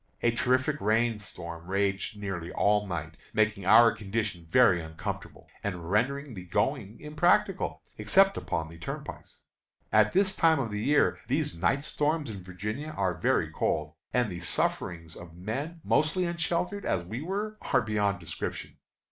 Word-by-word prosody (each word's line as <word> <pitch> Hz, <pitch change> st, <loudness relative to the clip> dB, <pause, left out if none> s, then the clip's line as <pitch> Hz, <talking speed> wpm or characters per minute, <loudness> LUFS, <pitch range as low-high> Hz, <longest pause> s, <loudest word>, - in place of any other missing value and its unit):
A 120 Hz, -, +4 dB
terrific 130 Hz, +5 st, +1 dB
rain 110 Hz, +1 st, +2 dB
storm 85 Hz, -4 st, -7 dB
raged 100 Hz, +1 st, -1 dB
nearly 95 Hz, -4 st, -4 dB
all 105 Hz, 0 st, +2 dB
night, 80 Hz, -4 st, -5 dB, 0.2 s
making 105 Hz, -3 st, +1 dB
our 115 Hz, +3 st, +8 dB
condition 105 Hz, -4 st, -3 dB
very 90 Hz, -4 st, +5 dB
uncomfortable, 80 Hz, 0 st, -6 dB, 0.2 s
and 90 Hz, -4 st, -4 dB
rendering 135 Hz, +6 st, 0 dB
the 95 Hz, -4 st, -7 dB
going 95 Hz, +4 st, -1 dB
impracticable, 155 Hz, -, +1 dB, 0.2 s
except 195 Hz, -, +4 dB
upon 80 Hz, -1 st, -2 dB
the 80 Hz, +1 st, -12 dB
turnpikes. 85 Hz, -, -7 dB, 0.5 s
At 110 Hz, -1 st, +5 dB
this 190 Hz, 0 st, +3 dB
time 160 Hz, -1 st, +4 dB
of 120 Hz, -5 st, -2 dB
the 105 Hz, 0 st, -2 dB
year 145 Hz, +6 st, +3 dB
these 150 Hz, +3 st, 0 dB
night 95 Hz, +12 st, +1 dB
storms 150 Hz, -2 st, 0 dB
in 100 Hz, -3 st, -7 dB
Virginia 105 Hz, +12 st, -5 dB
are 95 Hz, -2 st, +1 dB
very 80 Hz, -, +1 dB
cold, -, -, -1 dB, 0.2 s
and 125 Hz, -5 st, +1 dB
the 90 Hz, -, -5 dB
sufferings 80 Hz, 0 st, -1 dB
of 85 Hz, -1 st, -11 dB
men 140 Hz, -, -4 dB
mostly 155 Hz, +4 st, +2 dB
unsheltered, 170 Hz, +3 st, -1 dB
as 90 Hz, -2 st, -1 dB
we 110 Hz, +8 st, -5 dB
were, 205 Hz, +5 st, -3 dB
are 130 Hz, -3 st, +2 dB
beyond 105 Hz, -3 st, 0 dB
description. 80 Hz, -3 st, -5 dB
105 Hz, 155 wpm, -29 LUFS, 90-145 Hz, 0.5 s, our